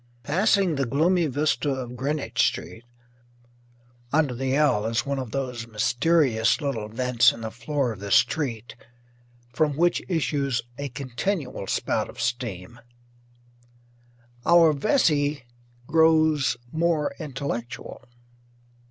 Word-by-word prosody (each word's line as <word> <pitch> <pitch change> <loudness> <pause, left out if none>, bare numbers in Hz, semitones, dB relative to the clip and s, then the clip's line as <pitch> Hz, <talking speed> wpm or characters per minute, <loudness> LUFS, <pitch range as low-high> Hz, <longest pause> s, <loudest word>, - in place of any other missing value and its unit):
Passing 185 - +2
the 135 -2 0
gloomy 165 +6 +2
vista 145 +1 0
of 130 -3 -4
Greenwich 130 -3 -1
Street 115 +1 -6 1.3
under 150 -3 +2
the 130 +2 -1
"L" 125 -8 +2
is 115 +1 -1
one 140 -1 -2
of 130 -3 -5
those 125 -2 -4
mysterious 120 +2 +2
little 135 -8 -3
vents 120 +1 +3
in 115 - -10
the 110 -1 -5
floor 125 +2 -2
of 105 - -8
the 100 0 -6
street 120 0 +1 0.8
from 145 +2 +1
which 175 +2 +2
issues 140 -7 0 0.2
a 140 0 -3
continual 130 - -4
spout - - -1
of - - -12
steam 115 -2 -4 1.6
our 170 -2 +5
Vesey 145 - +1 0.4
grows 155 -4 +3
more 160 -2 0
intellectual. 135 -6 -6
135 Hz, 115 wpm, -25 LUFS, 120-155 Hz, 1.6 s, our